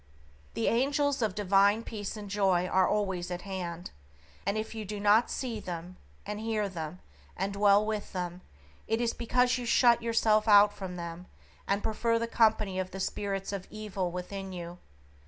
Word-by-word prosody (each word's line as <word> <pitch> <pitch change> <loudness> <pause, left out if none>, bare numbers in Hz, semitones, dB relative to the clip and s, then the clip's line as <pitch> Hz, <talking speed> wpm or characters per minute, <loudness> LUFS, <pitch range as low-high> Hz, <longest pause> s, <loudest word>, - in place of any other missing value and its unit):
The 230 - 0
angels 280 +3 +1
of 215 -4 0
divine 200 +2 +3
peace 210 -2 -5
and 210 -1 -7
joy 195 -3 +2
are 185 0 +3
always 190 -4 -1
at 180 0 -5
hand, 180 -3 -5 0.6
and 200 +2 +1
if 220 +1 -4
you 220 -1 -5
do 210 0 -5
not 210 +3 +4
see 240 -4 -3
them, 175 -1 -6 0.3
and 210 0 -4
hear 220 -2 -1
them, 170 -1 -6 0.4
and 195 +1 -2
dwell 200 +1 +4
with 215 -1 -3
them, 180 -1 -4 0.5
it 225 +1 +1
is 235 -1 0
because 250 +1 +1
you 245 - -5
shut 235 0 +5
yourself 225 -2 +2
out 205 -1 +7
from 190 -3 -6
them, 170 +1 -7 0.4
and 200 +1 0
prefer 230 +1 +1
the 230 - -1
company 215 -4 +2
of 185 0 -2
the 190 - -8
spirits 195 0 -3
of 195 -2 -5
evil 205 -4 -3
within 190 +2 -6
you. 175 -1 -7
205 Hz, 175 wpm, -30 LUFS, 185-220 Hz, 0.6 s, out